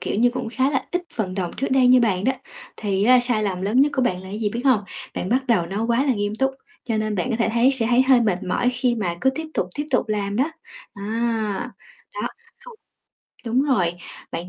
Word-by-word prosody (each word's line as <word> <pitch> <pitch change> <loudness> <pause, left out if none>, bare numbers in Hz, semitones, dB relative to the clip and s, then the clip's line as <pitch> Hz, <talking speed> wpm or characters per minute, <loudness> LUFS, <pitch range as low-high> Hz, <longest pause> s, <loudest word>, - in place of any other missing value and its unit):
kiểu - - -3
như, 245 +2 +4
cũng 245 -2 -4
khá 260 +4 +1
là 265 - 0
ít 355 0 0
vận 190 -5 -2
đồng 185 -3 -2
trước 275 - -1
đây 260 -1 +4
như 250 0 +6
bạn 200 -5 +1
đó, 265 - +3 0.4
thì 200 -1 0
á, 250 +1 +6
sai 245 -3 0
lầm 190 -3 -2
lớn 220 +7 +2
nhất 290 +1 +3
của 260 - +1
bạn 215 -7 +1
là 190 - -10
cái 205 +2 -5
gì, 215 - +1
biết 235 +3 -4
hông? 255 -6 +4 0.3
Bạn 185 - -3
bắt 260 +3 +1
đầu 215 -8 +2
nó 200 +5 -2
quá 235 +3 +2
là 270 - +3
nghiêm 205 -1 -2
túc, 270 +3 +1 0.3
cho 225 -3 -1
nên 215 0 -1
bạn 225 +6 -1
có 230 - 0
thể 230 - +1
thấy 240 +3 +4
sẽ 250 -4 0
thấy 245 +2 +4
hơi 260 -2 +5
mệt 200 -5 0
mỏi 215 +7 +1
khi 250 -1 0
mà 185 -7 -2
cứ 265 - +3
tiếp 315 +4 -5
tục, - - 0
tiếp 295 - -3
tục 250 -4 +1
làm 205 -1 -1
đó. 260 - +3 0.5
Á, 220 +1 -2 0.4
đó, - - -2 0.4
không - - -11 0.7
đúng 240 +4 +2
rồi, 195 -12 +2 0.4
bạn 170 +2 -4
230 Hz, 250 wpm, -22 LUFS, 205-255 Hz, 0.7 s, như